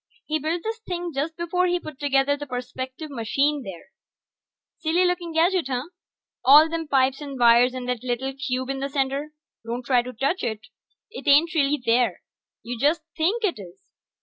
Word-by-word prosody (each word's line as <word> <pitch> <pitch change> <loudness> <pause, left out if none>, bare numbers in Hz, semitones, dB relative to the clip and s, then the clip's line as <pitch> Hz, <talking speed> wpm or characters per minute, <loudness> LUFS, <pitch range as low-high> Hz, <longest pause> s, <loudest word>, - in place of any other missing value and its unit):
He 310 0 -1
built 320 +3 -2
this 450 +1 -3
thing 355 -5 -4
just 300 +4 -3
before 360 +2 0
he 355 0 +1
put 310 -5 -10
together 280 0 +2
the 290 0 -7
perspective 255 +4 -6
machine 275 +4 0
there. 190 -6 -10 0.9
Silly 340 +3 +2
looking 355 -1 -1
gadget, 335 0 +2
huh? 260 +3 -3 0.5
All 295 +4 +8
them 325 -1 -4
pipes 270 0 +2
and 280 -2 -6
wires 240 +1 +5
and 250 -1 -5
that 250 -1 -2
little 255 +2 -2
cube 260 -1 -3
in 270 - -4
the 275 +1 -3
center... 275 +1 -2 0.3
don't 240 +2 -5
try 250 -3 +3
to 250 +1 -7
touch 275 - -1
it, 220 -2 -3 0.5
it 460 - -9
ain't 300 +4 +5
really 295 -2 +2
there. 230 -4 +2 0.4
You 240 0 -5
just 300 +4 +2
think 385 +9 0
it 370 - 0
is. 180 -2 -13
280 Hz, 180 wpm, -24 LUFS, 250-325 Hz, 0.9 s, All